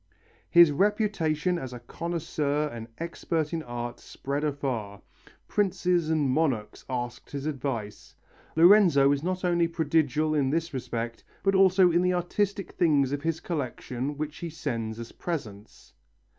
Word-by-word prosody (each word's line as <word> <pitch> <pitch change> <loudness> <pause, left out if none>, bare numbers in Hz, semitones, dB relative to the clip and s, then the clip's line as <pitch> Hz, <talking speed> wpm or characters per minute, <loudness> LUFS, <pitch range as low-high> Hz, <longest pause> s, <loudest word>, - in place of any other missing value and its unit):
His 170 -3 +7
reputation 180 -2 +1
as 130 -4 -6
a 125 - -7
connoisseur 150 +1 -2
and 115 -3 -8
expert 165 -1 -2
in 165 - -1
art 120 -3 -5
spread 140 +2 -4
afar. 125 -9 -3 0.5
Princes 180 -4 +1
and 155 -3 +2
monarchs 130 -6 0
asked 120 -1 -4
his 140 0 -5
advice. 130 -8 -4 0.4
Lorenzo 165 -5 +6
is 140 -1 +1
not 185 +2 -2
only 170 -1 +3
prodigal 155 -2 +1
in 140 -3 +2
this 165 +2 -1
respect, 120 -2 -4 0.2
but 195 - +3
also 190 -1 +5
in 170 +1 +3
the 180 0 +2
artistic 195 +2 -1
things 145 -6 +2
of 145 0 -2
his 160 +1 -1
collection 135 -3 -4
which 150 0 -4
he 170 - -5
sends 115 -8 -4
as 115 0 -8
presents. 110 - -7
150 Hz, 145 wpm, -27 LUFS, 130-170 Hz, 0.5 s, His